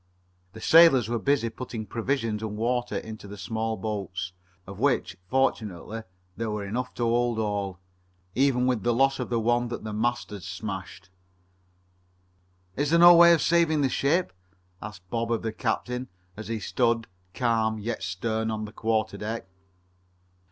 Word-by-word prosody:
The 110 - -10
sailors 155 -8 +6
were 120 -1 0
busy 125 -2 +1
putting 115 -2 -6
provisions 115 -2 -2
and 105 -1 -4
water 120 +2 -1
into 110 -2 -8
the 100 +1 -9
small 110 +2 -2
boats, 95 -4 -4 0.3
of 100 +1 -10
which, 130 -7 +1
fortunately, 115 -5 -1 0.3
there 115 -1 -3
were 105 -1 -3
enough 125 +5 -4
to 120 - -2
hold 120 0 +1
all, 100 -4 -2 0.6
even 130 0 +2
with 125 -4 +1
the 120 +4 +1
loss 135 +2 +3
of 125 - -3
the 120 -1 +1
one 120 +2 +1
the 110 -2 -5
mast 120 +2 -1
had 100 -2 -7
smashed. 95 -1 -7 1.6
"Is 145 +1 0
there 170 - +4
no 175 +1 +9
way 170 0 +8
of 170 - +4
saving 165 -3 +3
the 135 - +2
ship?" 155 - +1 0.5
asked 100 -4 -9
Bob 115 0 -1
of 115 - 0
the 110 -1 -2
captain 125 +2 -2 0.3
as 110 - -8
he 115 0 -2
stood, 115 +2 +1 0.3
calm, 110 -3 +1
yet 110 +2 -4
stern, 110 +4 -2
on 110 -1 -3
the 105 - -10
quarter 110 -2 -1
deck. 110 +1 -4
115 Hz, 160 wpm, -26 LUFS, 105-125 Hz, 1.6 s, no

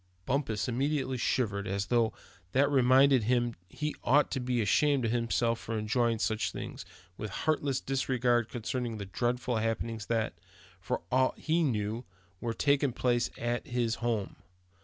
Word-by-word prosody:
Bumpus 115 -7 -1
immediately 130 0 -1
shivered, 105 -5 0
as 100 +1 -1
though 115 -1 +2 0.4
that 140 +2 +3
reminded 130 -2 +5
him 120 0 +2 0.2
he 150 +6 -3
ought 145 +3 +4
to 135 - -1
be 125 -1 -1
ashamed 135 +5 +3
of 110 - 0
himself 115 -1 0
to 115 - -2
be - - 0
enjoying 115 +2 +1
such 110 0 0
things, - - -7 0.3
with 105 - -4
heartless 140 +4 0
disregard 125 -3 +1
concerning 120 -1 -3
the 100 - -5
dreadful 120 +4 -1
happenings 115 -1 -2
that, 115 -2 0 0.5
for - - -2
aught 130 +1 +2
he 165 +2 +1
knew, 110 -5 -1 0.4
were 115 - -2
taking 140 -2 +2
place 120 -1 +1
at 120 +5 -2
his 120 -3 0
home. 115 -4 -1
120 Hz, 155 wpm, -30 LUFS, 115-130 Hz, 0.5 s, reminded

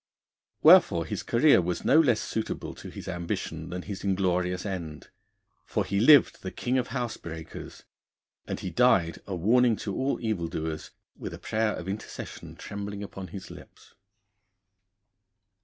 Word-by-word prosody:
Wherefore 85 -1 +7
his - - -4
career 130 -2 +4
was 90 +1 -3
no 155 - +6
less 125 -9 +4
suitable 110 +1 -4
to - - -10
his - - -9
ambition 85 -2 -4
than 90 0 -5
his 100 -3 -6
inglorious 90 -1 0
end. 85 -6 -5 0.5
For - - -1
he 100 - 0
lived 145 +6 +6
the 95 - -4
king 125 +6 -1
of 125 - -2
housebreakers, 110 -10 -6 0.6
and - - -3
he - - -4
died 85 -1 +3
a 100 - -3
warning 115 +6 +4
to 100 -1 -5
all 135 +1 0
evildoers, 80 -7 -3 0.3
with - - -6
a - - -10
prayer 110 0 -1
of 90 - -7
intercession 100 +2 -7
trembling 100 0 -6
upon 95 -1 -7
his 95 0 -9
lips. - - -14
95 Hz, 145 wpm, -28 LUFS, 85-110 Hz, 0.6 s, Wherefore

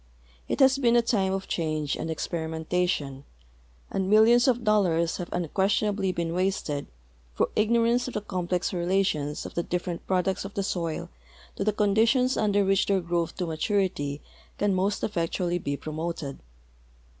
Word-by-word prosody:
It - - -1
has 265 0 +5
been 240 -3 +3
a 240 - +5
time 200 -5 +1
of 195 0 -3
cbange 155 -3 -1
and 165 - -4
experimentation, 160 -3 -2 0.7
and 190 -1 -1
millions 230 +4 +6
of 245 -2 +2
dol 215 -1 +4
lars 170 -2 +1
have 175 -1 -5
unquestionably 195 +3 0
been 170 -2 -2
wasted 180 -6 -1 0.5
through - - +1
ignorance 235 +3 +2
of 255 - -7
the 210 - -1
complex 180 -3 -2
relations 175 -5 0
of - - -7
the 170 - 0
different 175 0 -4
products 190 0 0
of 195 +1 -8
the 200 - 0
soil 170 -5 -3 0.5
to - - -2
the 215 - +2
con 205 -1 +1
ditions 250 +4 +3
under 205 -2 +2
which 195 0 +2
their 195 -1 +3
growth 170 -1 -2
to 180 - -2
maturit}'' 160 -4 -1 0.4
can 205 -1 +1
most 195 +2 0
effectu 175 -2 -1
all}^ 175 0 -1
be 140 0 -2
promoted. 155 -2 -5
185 Hz, 165 wpm, -27 LUFS, 165-210 Hz, 0.7 s, millions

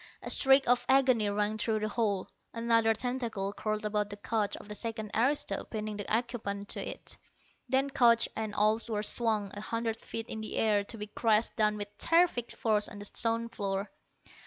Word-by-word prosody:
A - - -1
shriek 270 0 +5
of 245 0 +3
agony 255 -6 +4
rang 210 +1 -1
through 220 -1 0
the 215 - 0
hall. 205 -3 -1 0.3
Another 230 -1 +3
tentacle 225 -5 -2
curled 215 +1 -3
about 210 -1 0
the 205 - -6
couch 210 0 -1
of 210 - -12
a - - -3
second 220 0 -4
aristo, 265 +6 +1
pinning 215 -1 -5
the 205 - -6
occupant 215 -3 -2
to - - -2
it. - - -5 0.5
Then 270 +2 +2
couch 235 -3 +4
and 215 -1 -4
all 215 +2 +3
were 210 -2 -1
swung 215 -3 0
a 205 - -7
hundred 230 +1 -3
feet 225 0 -5
in 220 - -6
the 215 - -5
air 210 -2 +3
to 225 - -5
be 210 - -5
crashed 215 +1 +1
down 210 -2 +2
with 205 0 -6
terrific 330 -8 +3
force 215 -2 +1
on 210 - -10
the 205 - -2
stone 230 +2 +1
floor. 200 -2 -3
220 Hz, 190 wpm, -30 LUFS, 210-230 Hz, 0.5 s, shriek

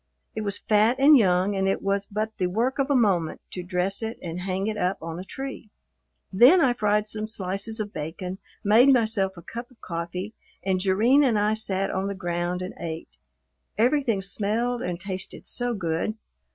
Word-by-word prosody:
It 220 - -2
was 205 -1 0
fat 215 +3 +3
and 285 +3 +7
young, 190 -3 +3
and 195 0 0
it 195 - -1
was 200 0 0
but 215 +2 -3
the 180 - +2
work 235 +9 -1
of 275 +1 +1
a 285 - +3
moment 190 -9 +2
to 180 - -4
dress 180 +3 -2
it 225 0 -4
and 170 0 -6
hang 190 +1 -2
it 215 0 -1
up 185 -2 0
on 165 +1 -6
a - - -5
tree. 265 +1 -7 0.6
Then 250 - +7
I 265 -6 +4
fried 210 -2 +1
some 215 0 -4
slices 205 +1 -1
of 210 -1 -4
bacon, 180 +5 -5 0.2
made 230 +7 +6
myself 220 -6 +1
a 170 - -10
cup 235 +6 -7
of 250 - -23
coffee, 180 +4 -5 0.3
and 190 -1 +1
Jerrine 215 +10 +4
and 240 -6 +3
I 210 +1 +2
sat 195 -3 -1
on 190 +1 -2
the 200 - -3
ground 175 -1 -2
and 185 - -6
ate. 165 -1 -7 0.6
Everything 235 -3 +2
smelled 225 +5 -1
and 175 -6 -3
tasted 190 0 -5
so 245 -1 0
good! 170 +3 -2
200 Hz, 190 wpm, -25 LUFS, 185-225 Hz, 0.6 s, and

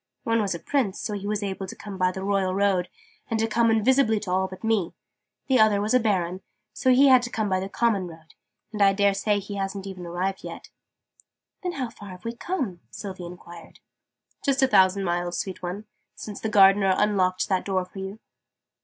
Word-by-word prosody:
One 230 -1 +1
was 195 -4 -1
a - - -6
Prince; 240 - -1
so 210 - -3
he 200 0 -4
was 210 0 -1
able 195 -1 -4
to - - -8
come 200 -3 -9
by 185 0 +3
the 190 +1 -6
Royal 195 -2 0
Road, 195 -3 +1 0.4
and 225 -2 0
to 225 - +2
come 230 +1 +2
invisibly 225 0 +3
to 190 - -5
all 190 +1 +1
but 185 +2 -11
me: 220 -6 0 0.5
the 260 -3 +3
other 215 -2 +5
was 210 +3 0
a 255 - +6
Baron; 185 -5 0 0.3
so 260 - 0
he 265 +2 +6
had 255 -2 +7
to 240 - -4
come 220 -3 -1
by 185 -1 +1
the 190 +1 -4
common 205 -5 +1
road, 160 -1 -14 0.4
and 210 - -3
I 195 -1 +6
dare 200 0 +3
say 205 +1 +1
he 200 0 -6
hasn't 195 0 -3
even 185 -3 -7
arrived 185 +3 -3
yet." - - -9 0.9
"Then 360 -1 -3
how 255 -6 -4
far 205 - -11
have 185 +3 -11
we 230 - -3
come?" 240 - -3
Sylvie 185 -4 -7
enquired. 175 -1 -12 0.6
"Just 275 -1 +2
a - - +6
thousand 195 -2 +4
miles, 175 -1 -1
sweet 190 -2 -4
one, 185 +4 -5 0.3
since 210 -2 -7
the 220 - -2
Gardener 195 -1 +5
unlocked 185 -3 +1
that 190 -2 +1
door 190 -2 -1
for 185 +2 -11
you." 190 +2 -6
200 Hz, 215 wpm, -25 LUFS, 185-220 Hz, 0.9 s, had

